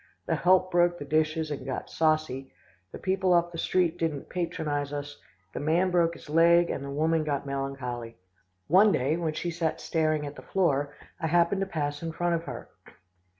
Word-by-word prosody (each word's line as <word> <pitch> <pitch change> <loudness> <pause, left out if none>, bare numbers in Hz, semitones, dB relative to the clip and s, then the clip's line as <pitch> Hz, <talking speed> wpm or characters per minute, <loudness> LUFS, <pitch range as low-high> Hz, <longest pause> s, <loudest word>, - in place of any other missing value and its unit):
The - - 0
help 185 +1 +3
broke 175 0 +3
the 145 - -7
dishes, 155 +1 0
and 145 - -4
got 130 - -4
saucy, 155 -4 0 0.4
the - - -7
people 190 -1 +1
off 175 0 +3
the 165 - -6
street 175 -1 +1
didn't 155 -4 -2
patronise 155 -5 -2
us, 145 0 -6 0.3
the - - -4
man 170 +5 +2
broke 170 -1 +2
his - - -13
leg, 170 +2 +4
and 140 - -4
the 140 - -6
woman 160 +3 +1
got 145 -2 -2
melancholy. 135 -5 -4 0.5
One 200 +6 +6
day 140 -1 +1
when 165 -2 -2
she 175 +2 -3
sat 160 -1 -2
staring 155 -2 0
at 145 0 -7
the - - -10
floor, 145 -7 0 0.2
I 160 - -1
happened 170 +4 +2
to 195 - -1
pass 145 -4 -3
in 165 -1 -4
front 175 +1 0
of 165 0 -2
her. 125 -4 -7
160 Hz, 195 wpm, -28 LUFS, 145-175 Hz, 0.5 s, One